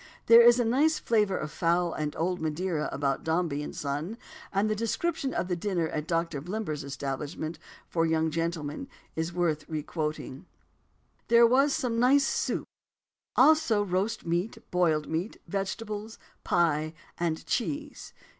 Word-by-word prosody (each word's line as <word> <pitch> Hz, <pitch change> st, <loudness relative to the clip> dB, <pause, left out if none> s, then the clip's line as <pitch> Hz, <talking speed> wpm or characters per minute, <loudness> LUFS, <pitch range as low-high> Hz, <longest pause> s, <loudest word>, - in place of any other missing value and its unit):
There 230 Hz, +1 st, +9 dB
is 240 Hz, +1 st, +7 dB
a 240 Hz, -, +2 dB
nice 295 Hz, +7 st, +3 dB
flavour 210 Hz, -8 st, +1 dB
of 155 Hz, -, -4 dB
fowl 170 Hz, +1 st, +1 dB
and 150 Hz, -1 st, -3 dB
old 180 Hz, +2 st, -1 dB
Madeira 160 Hz, +1 st, -1 dB
about 140 Hz, -1 st, -1 dB
Dombey 160 Hz, -3 st, 0 dB
and 150 Hz, -, -6 dB
Son, 150 Hz, +9 st, -3 dB, 0.3 s
and 200 Hz, +2 st, +1 dB
the 215 Hz, -, 0 dB
description 265 Hz, +6 st, -1 dB
of 185 Hz, -, -2 dB
the 180 Hz, -, 0 dB
dinner 170 Hz, -3 st, -1 dB
at 155 Hz, 0 st, -4 dB
Doctor 165 Hz, -4 st, -1 dB
Blimber's 175 Hz, -4 st, -4 dB
establishment 140 Hz, +3 st, -4 dB, 0.3 s
for 165 Hz, -, 0 dB
young 160 Hz, -1 st, +1 dB
gentlemen 165 Hz, -2 st, -3 dB, 0.3 s
is 160 Hz, +1 st, -2 dB
worth 165 Hz, -3 st, 0 dB
requoting: 150 Hz, -3 st, -4 dB, 0.8 s
"There 235 Hz, 0 st, +7 dB
was 270 Hz, +4 st, +4 dB
some 230 Hz, -2 st, -1 dB
nice 270 Hz, +3 st, +5 dB
soup; -, -, -1 dB, 0.7 s
also 240 Hz, -10 st, +5 dB
roast 190 Hz, +4 st, -1 dB
meat, 175 Hz, +5 st, -1 dB
boiled 160 Hz, -4 st, +2 dB
meat, 170 Hz, +7 st, -3 dB
vegetables, 210 Hz, +2 st, -4 dB, 0.3 s
pie, 155 Hz, -2 st, +1 dB, 0.2 s
and 165 Hz, -2 st, -1 dB
cheese." 290 Hz, +4 st, -3 dB
175 Hz, 145 wpm, -28 LUFS, 155-220 Hz, 0.8 s, There